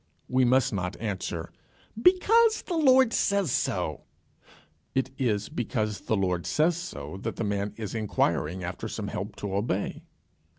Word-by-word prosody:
We 130 0 +3
must 130 0 +3
not 90 -2 -3
answer 95 -6 -4 0.5
"Because 440 - +5
the 360 - -4
Lord 265 -6 +5
says 200 -7 +2
so." - - -1 0.9
It 130 0 0
is 105 -6 0
because 110 -3 -2
the 110 - 0
Lord 90 -3 0
says 160 +3 +2
so 175 - -6
that - - -3
the - - -3
man 100 0 -2
is 110 -3 -5
inquiring 90 -5 0
after 90 0 -4
some - - -4
help - - -5
to 100 -2 -5
obey. 100 0 -1
110 Hz, 145 wpm, -27 LUFS, -, 0.9 s, Because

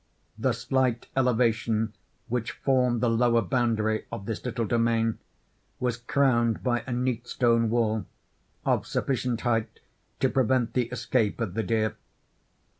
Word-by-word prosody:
The - - +1
slight 130 -3 0
elevation 115 -4 +1 0.3
which 115 -2 -2
formed 125 -3 +1
the 120 - +3
lower 115 0 +3
boundary 110 +1 0
of 100 - -6
this 110 -1 -4
little 120 -2 -2
domain, 115 0 +1 0.6
was 125 -2 -1
crowned 120 -2 +1
by 120 -2 0
a - - -4
neat 125 -1 -1
stone 115 -2 +2
wall, 110 -4 0 0.6
of - - +1
sufficient 125 -3 -1
height 115 -3 -1 0.4
to - - +3
prevent 130 -1 +1
the 125 -2 +2
escape 115 -3 0
of 110 -6 -2
the 115 - 0
deer. 110 +1 0
115 Hz, 135 wpm, -27 LUFS, 115-125 Hz, 0.6 s, the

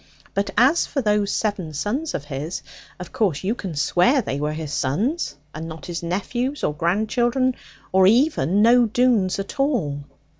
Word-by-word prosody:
But 200 +1 -1
as 265 +9 +4
for 280 - -2
those 210 -4 +1
seven 190 -8 -2
sons 255 - -2
of 145 - -4
his, 145 +4 -5 0.4
of 180 - -8
course 190 -9 0
you 200 +4 +1
can 190 -8 -6
swear 175 - +3
that 265 -7 +1
they 140 - -2
were 150 +1 -1
his 155 -2 -5
sons 205 - -1 0.2
and 160 +1 -6
not 160 -3 -9
his 175 -1 -4
nephews, 240 +11 -2
or - - +1
grandchildren, 235 - +1 0.4
or 190 0 +5
even 220 - +3
no 240 +1 +5
Doones 225 -5 +2
at 195 +8 -6
all?' 185 - 0
200 Hz, 175 wpm, -22 LUFS, 160-245 Hz, 0.4 s, or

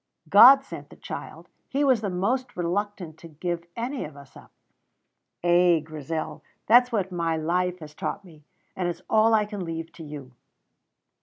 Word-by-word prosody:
"God 255 - +9
sent - - -10
the - - -14
child; - - -8 0.2
He 275 - -1
is 260 -6 +3
most 220 +6 -2
reluctant 180 -2 -3
to 170 - -11
give 170 +2 -4
any 250 +3 -3
of 150 -1 -9
us 140 -1 -15
up. - - -15 0.9
Ay, 175 -1 +4
Grizel, 155 0 -5 0.2
that's 245 +3 +5
what 195 -5 -1
my 165 -2 -1
life 180 +3 -1
has 150 -1 -10
taught 195 - -5
me, 155 -4 -17 0.3
and 180 -2 -1
it's 175 +1 -6
all 220 +1 +4
I 210 -1 +2
can 205 -2 -6
leave 165 -1 -5
to 165 - -11
you." 145 -4 -9
180 Hz, 165 wpm, -25 LUFS, 165-215 Hz, 0.9 s, God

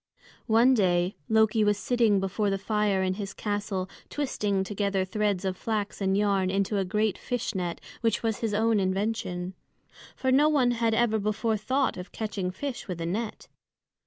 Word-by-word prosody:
One 235 +3 +5
day 180 -3 +2
Loki 220 0 +4
was 205 -1 +3
sitting 225 -3 +2
before 195 +2 0
the 195 - 0
fire 205 -1 +1
in 185 0 +1
his 195 0 -6
castle 205 -3 -2 0.2
twisting 210 -9 -1
together 200 -1 -1
threads 205 -1 -1
of 190 -1 -1
flax 210 0 -3
and 190 0 +2
yarn 200 -2 +2
into 200 +1 0
a - - +1
great 210 +2 0
fish 245 -2 -2
net 180 -3 -3 0.2
which 230 0 +1
was 225 -2 0
his 220 -3 -1
own 220 0 +3
invention. 190 -2 -1 0.6
For 260 - 0
no 290 +4 +5
one 265 -5 +3
had 230 -2 +1
ever 225 -2 +2
before 215 +2 0
thought 260 +5 0
of 180 +1 -8
catching 205 -4 -3
fish 265 +7 -5
with 180 -3 -4
a 165 - -2
net. 210 +6 -3
210 Hz, 175 wpm, -27 LUFS, 190-225 Hz, 0.6 s, One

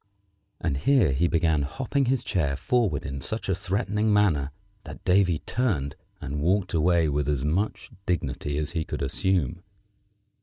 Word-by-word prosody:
and 75 -4 -1
here 120 - +3
he 80 +7 +2
began 80 -3 +2
hopping 135 - -1
his 125 0 +1
chair 85 -11 0
forward 85 - 0
in 70 -1 -5
such 110 +11 -3
a 95 - +2
threatening 105 +3 0
manner 90 -10 +3 0.3
that - - -10
Davy 90 -3 +3
turned 85 - -1 0.2
and 75 +2 -4
walked 95 +4 +1
away 85 0 +3
with 75 -1 0
as 70 -2 0
much 95 +8 -1 0.2
dignity 75 -4 -1
as 75 0 -2
he 80 -3 -1
could - - -4
assume. 85 +2 0
85 Hz, 155 wpm, -26 LUFS, 75-105 Hz, 0.3 s, here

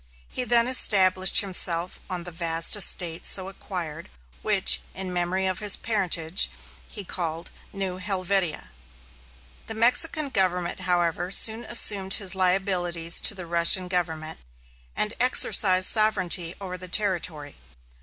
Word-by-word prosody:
He 250 - -3
then 235 0 +2
established 190 -7 +4
himself 180 -3 -2
on 180 -2 -4
the 175 - -9
vast 165 +2 0
estates 175 -4 0
so 190 -1 -2
acquired, 170 -5 -9 0.3
which, - - +3
in 185 -1 -6
memory 180 +2 -3
of 185 -1 -3
his 210 -2 +2
parentage, 185 -6 -1 0.4
he 205 - -9
called 170 -2 -5 0.2
New 190 -2 -6
Helvetia. 185 - -2 1.0
The 225 - -7
Mexican 275 +6 +1
Government, 180 -6 -1
however, 175 0 -1
soon 220 +4 +2
assumed 200 -4 +2
his 195 -3 -1
liabilities 180 -3 -1
to 210 - +4
the 185 -2 -9
Russian 170 +2 +3
Government, 160 -3 -4 0.6
and 210 +1 -1
exercised 185 -6 +4
sovereignty 185 -6 +2
over 185 -2 -8
the 185 - -6
territory. 175 -7 -3
185 Hz, 125 wpm, -23 LUFS, 175-200 Hz, 1.0 s, established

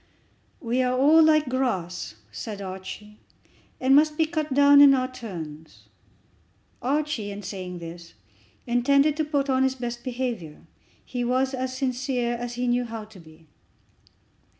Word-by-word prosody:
"We 250 -3 0
are 255 0 +1
all 300 +5 +6
like 310 -2 +4
grass," 190 - -2 0.2
said 205 - -6
Archie, 195 +2 -8 0.6
"and 265 +1 +4
must 300 +1 +4
be 320 - +3
cut 310 -2 -3
down 285 +1 +7
in 280 -1 +8
our 255 -1 0
turns." 160 - -9 0.9
Archie, 275 -5 -1
in 205 0 -7
saying 185 -2 -6
this, 170 0 -10 0.5
intended 280 +4 +3
to 315 - +1
put 290 -2 -1
on 260 -1 +2
his 265 0 +2
best 240 -1 -5
behaviour. 240 - -4 0.4
He 245 -1 -3
was 260 +2 0
as 260 0 -3
sincere 255 -2 -1
as 240 0 -5
he 250 +1 -2
knew 245 0 +1
how 225 -1 -6
to 210 -3 -16
be. 160 -1 -17
250 Hz, 150 wpm, -25 LUFS, 205-270 Hz, 0.9 s, in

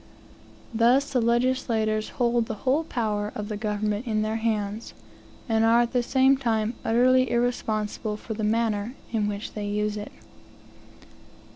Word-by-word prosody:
Thus 250 +5 +3
the 250 - +2
legislators 230 -2 +1
hold 240 -2 +1
the 220 - -4
whole 275 +5 +2
power 210 -7 -2
of 210 0 -5
the 210 - -3
government 210 +2 -2
in 215 -1 0
their 215 +1 -1
hands, 220 -1 -2 0.5
and 225 -1 +2
are 230 +1 +5
at 240 +1 -1
the 250 - +3
same 265 +2 +3
time 225 -3 0
utterly 255 +2 +3
irresponsible 220 -3 -1
for 220 - -6
the 215 0 -4
manner 220 +1 0 0.2
in 215 -3 0
which 205 0 -5
they 210 -1 -4
use 210 +1 -1
it. 210 - -7
225 Hz, 150 wpm, -25 LUFS, 210-240 Hz, 0.5 s, are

